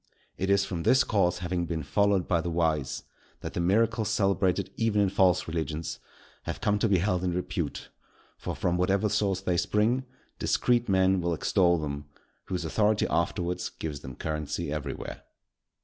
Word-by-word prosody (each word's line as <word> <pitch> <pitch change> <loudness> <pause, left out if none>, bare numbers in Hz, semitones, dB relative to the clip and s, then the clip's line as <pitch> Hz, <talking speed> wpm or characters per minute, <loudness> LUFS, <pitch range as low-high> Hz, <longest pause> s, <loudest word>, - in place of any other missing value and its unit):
It 95 - -2
is 100 0 +4
from 85 -3 -4
this 130 +10 +4
course 90 -5 +1
having 85 -1 -1
been 80 -1 -3
followed 100 +5 +2
by 85 -2 +2
the 85 - -3
wise, 80 -5 0 0.4
that - - -6
the - - -2
miracles 110 +5 +2
celebrated 95 -2 +1
even 115 -2 +1
in 100 -1 +3
false 95 -2 +3
religions, 80 -1 -3 0.5
have - - -4
come 105 0 +1
to 115 - +2
be 95 - +4
held 90 0 0
in 90 -1 0
repute; 90 - -3 0.5
for - - -5
from 90 0 0
whatever 100 +4 +2
source 100 -2 0
they 90 -2 0
spring, 110 +8 +1 0.3
discreet 120 -2 +2
men 95 -1 +3
will 85 -1 0
extol 85 +1 +3
them, 75 -2 -4 0.4
whose 90 -3 -3
authority 105 +5 +2
afterwards 85 +1 -1
gives 75 -3 -6
them 65 -2 -9
currency 75 -1 -3
everywhere. 70 -3 -5
90 Hz, 165 wpm, -28 LUFS, 85-100 Hz, 0.5 s, is